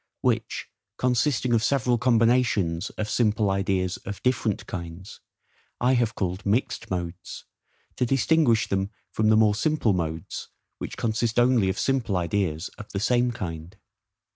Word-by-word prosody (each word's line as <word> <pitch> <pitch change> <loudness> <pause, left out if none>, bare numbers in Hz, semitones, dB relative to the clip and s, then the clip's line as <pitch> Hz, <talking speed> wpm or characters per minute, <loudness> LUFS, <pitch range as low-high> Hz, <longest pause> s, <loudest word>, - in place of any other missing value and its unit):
which - - -1 0.3
consisting 125 0 +1
of 115 -1 +3
several 125 -2 +2
combinations 115 -8 +2
of 105 - -2
simple 105 -2 +1
ideas 95 -1 0
of 100 0 -7
DIFFERENT 120 -5 0
kinds, 85 +1 -7 0.6
I 125 +2 +3
have 120 -3 +1
called 95 0 -2
mixed 105 +6 -1
modes, 90 0 -5 0.5
to 125 - +1
distinguish 135 -2 +3
them 95 0 -1 0.2
from 110 0 +1
the 110 - +5
more 110 -1 +5
simple 120 -2 +1
modes, 80 -2 -4 0.3
which - - -6
consist 115 0 -1
only 120 -5 +4
of 95 - -2
simple 130 -8 0
ideas 85 -1 -1
of 105 - -9
the 100 - -1
SAME 120 +3 +2
kind. 85 -2 -6
110 Hz, 140 wpm, -25 LUFS, 95-120 Hz, 0.6 s, the